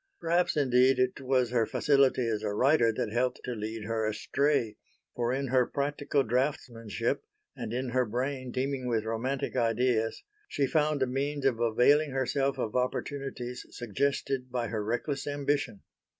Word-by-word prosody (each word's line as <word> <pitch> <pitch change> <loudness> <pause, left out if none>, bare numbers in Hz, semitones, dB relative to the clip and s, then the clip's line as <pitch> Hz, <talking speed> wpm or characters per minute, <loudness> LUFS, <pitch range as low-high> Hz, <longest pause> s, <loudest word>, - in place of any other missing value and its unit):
Perhaps, 170 0 +1
indeed, 130 -1 +4
it 130 +1 0
was 130 -2 +1
her 115 -3 +2
facility 135 -4 +3
as 110 -2 -1
a 110 - -2
writer 125 -1 +4
that 110 -1 -3
helped 125 +1 0
to 125 - -4
lead 110 0 -5
her 115 0 -1
astray; 120 +1 0 0.4
for 120 0 0
in 135 0 -1
her 125 -1 +3
practical 145 0 0
draughtsmanship 115 -3 -1 0.3
and - - -5
in 125 +2 -2
her 130 +1 +2
brain 130 +3 -3
teeming 130 0 -2
with 115 -3 0
romantic 125 +6 -2
ideas 115 -1 +1 0.2
she 140 - 0
found 150 0 +1
a - - +3
means 140 +2 -2
of 125 -4 +2
availing 125 +6 +4
herself 135 +1 0
of 110 - -3
opportunities 125 -1 -3
suggested 130 +2 -2
by 120 -3 -2
her 105 0 -2
reckless 135 +6 -2
ambition. 145 -6 -1
125 Hz, 155 wpm, -29 LUFS, 115-140 Hz, 0.4 s, indeed